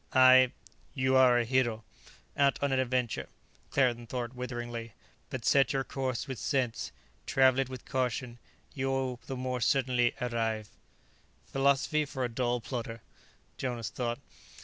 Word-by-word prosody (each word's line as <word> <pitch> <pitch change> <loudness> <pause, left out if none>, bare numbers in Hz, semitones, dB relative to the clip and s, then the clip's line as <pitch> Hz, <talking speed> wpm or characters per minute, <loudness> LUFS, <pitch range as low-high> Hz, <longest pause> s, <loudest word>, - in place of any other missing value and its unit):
"I 130 -1 +7 0.2
" - - -34
"You 130 0 +3
are 130 -2 +6
a 120 - +1
hero, 120 -3 +1 0.5
out 140 -1 +3
on 140 - +1
an 130 - +2
adventure," 125 -2 -1 0.4
Claerten 120 -3 +1
thought 120 -1 -3
witheringly. 120 -2 -5 0.4
"But 130 -3 -5
set 140 +1 +4
your 135 -1 0
course 130 0 -3
with 130 -3 -5
sense, 120 -8 -1 0.4
travel 130 -1 +4
it 135 -1 0
with 130 -2 -8
caution; 125 -1 -2 0.3
you 135 -1 -2
will 130 -2 -1
the 135 - -4
more 125 -1 -2
certainly 125 0 +2
arrive." 115 -3 -1 0.8
"Philosophy 140 +2 +2
for 135 -2 -4
a 125 - 0
dull 120 0 -1
plodder," 115 -2 -5 0.6
Jonas 120 -4 -3
thought. 120 -1 -2
125 Hz, 150 wpm, -30 LUFS, 120-130 Hz, 0.8 s, I